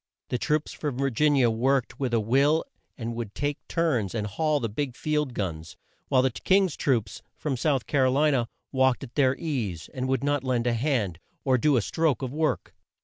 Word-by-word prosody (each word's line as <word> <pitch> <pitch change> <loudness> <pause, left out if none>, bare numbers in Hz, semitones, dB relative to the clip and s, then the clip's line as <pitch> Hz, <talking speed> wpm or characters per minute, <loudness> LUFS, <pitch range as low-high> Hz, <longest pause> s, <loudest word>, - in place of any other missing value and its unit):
The 125 - -1
troops 150 +2 0
from 145 -5 -4
Vir 135 0 0
gin 145 +5 +3
i 135 - +4
a 120 -2 +4
worked 125 +2 0
with 130 -3 -1
a 115 - +3
will 140 +8 +3 0.3
and 115 -1 -4
would 115 -3 -5
take 145 0 -2
turns 125 - 0
and 105 -2 -1
haul 150 +8 0
the 115 - -1
big 125 +4 -3
field 150 -4 -1
guns, 80 -5 -4 0.3
while 130 -2 +3
the 130 - +2
King's 190 - +2
troops, 115 -8 0 0.2
from 145 -4 -2
South 135 -1 0
Car 135 -3 +2
o - - +2
li 150 +3 +3
na, 125 -4 +1 0.3
walked 130 -1 +2
at 125 -2 -9
their 135 -2 +3
ease, 120 - -3
and 130 0 -2
would 135 +1 0
not 145 -1 +1
lend 125 -2 0
a 120 - +2
hand, 115 - 0 0.2
or 130 -2 +3
do 145 0 +3
a 115 - +1
stroke 160 -2 0
of 130 0 -3
work. 155 +1 -1
130 Hz, 215 wpm, -26 LUFS, 115-145 Hz, 0.3 s, i